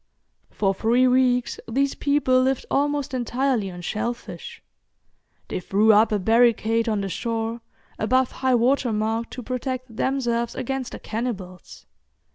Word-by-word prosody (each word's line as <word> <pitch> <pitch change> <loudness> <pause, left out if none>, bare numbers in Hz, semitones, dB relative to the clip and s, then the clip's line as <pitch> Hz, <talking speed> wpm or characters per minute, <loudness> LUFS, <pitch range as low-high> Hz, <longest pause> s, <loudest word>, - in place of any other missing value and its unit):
For 195 -2 0
three 235 +6 +3
weeks 250 -1 +2
these 275 +4 +1
people 280 -3 +2
lived 265 0 0
almost 285 -1 0
entirely 245 -3 0
on 175 -1 -9
shellfish. 230 +6 -5 0.8
They - - -3
threw 210 +4 +3
up 215 +2 +4
a 210 - +2
barricade 230 +1 +3
on 210 -2 0
the 195 - -3
shore, 225 +3 -3 0.4
above 255 +3 +2
high 260 -1 +1
water 245 +1 +2
mark, 220 +2 -1
to 250 - -8
protect 255 -1 -4
themselves 235 -2 -1
against 260 0 -4
the - - -7
cannibals. 210 -6 -6
235 Hz, 135 wpm, -24 LUFS, 220-255 Hz, 0.8 s, up